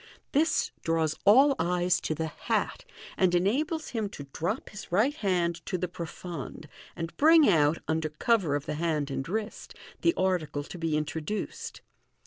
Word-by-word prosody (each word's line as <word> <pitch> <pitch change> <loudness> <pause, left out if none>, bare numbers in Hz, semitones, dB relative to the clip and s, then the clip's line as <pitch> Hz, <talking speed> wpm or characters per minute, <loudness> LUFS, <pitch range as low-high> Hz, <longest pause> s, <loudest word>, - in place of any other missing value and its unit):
This 315 +3 +2
draws 160 -2 +1
all 270 +7 +7
syes 175 0 +1
to 155 - -2
the 160 - -2
hat, 155 - -2 0.3
and 185 -2 +3
enables 295 - 0
him 220 -4 -2
to 145 - -8
drop 180 +10 -2
his 205 -3 -10
right 220 +11 +3
hand 175 - 0
to 185 - -1
the 180 +1 -2
profonde, 165 -3 -7 0.3
and 165 0 -5
bring 315 0 +7
out, 155 -3 +4
under 160 0 0
cover 170 -1 +1
of 145 0 -3
the - - -3
hand 155 -4 0
and 135 +2 -3
wrist, 215 +2 -4 0.3
the 335 - +3
article 160 -6 0
to 175 - -9
be 160 -2 0
introduced. 155 +6 -4
175 Hz, 160 wpm, -28 LUFS, 160-215 Hz, 0.3 s, all